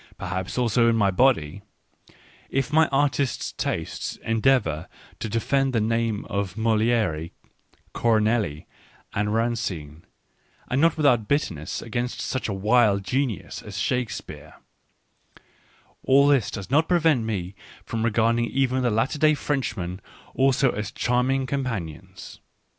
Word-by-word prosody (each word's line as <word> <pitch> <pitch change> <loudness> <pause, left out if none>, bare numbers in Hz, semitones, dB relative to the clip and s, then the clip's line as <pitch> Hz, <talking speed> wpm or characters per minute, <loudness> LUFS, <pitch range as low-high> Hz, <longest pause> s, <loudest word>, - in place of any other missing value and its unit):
— - - -36
perhaps 90 +2 -4
also 115 -1 +3
in 115 - +2
my 100 -3 +3
body; 100 - +2 0.9
if 135 +2 -1
my 160 0 +5
artist's 140 -1 0
taste 80 - -4
endeavours 115 - +1 0.3
to 110 - -4
defend 135 +5 0
the 115 - +2
names 115 -1 0
of 100 -1 -3
Moltere,^ 110 -7 +1 0.6
Corneille, 110 -8 +1 0.5
and 105 +1 0
Racine, 105 -10 -2 0.7
and 130 +3 +2
not 165 0 +3
without 125 -8 +3
bitterness, 85 - -2
against 120 +2 -3
such 130 -3 -3
a - - -1
wild 105 0 +3
genius 125 0 -2
as - - -8
Shakespeare 125 -3 -3 0.8
— - - -30
all 140 +1 +6
this 135 -7 +3
does 100 +2 -7
not 155 +3 +3
prevent 160 -8 +3
me 100 -4 -3 0.3
from 115 - -3
regarding 115 +1 +2
even 130 +1 0
the 125 - +2
latter 115 +7 0
day 155 0 +4
Frenchmen 110 -12 -3 0.3
also 135 -1 +3
as 105 0 -4
charming 125 +4 0
companions. 115 - -5
115 Hz, 130 wpm, -24 LUFS, 100-135 Hz, 0.9 s, all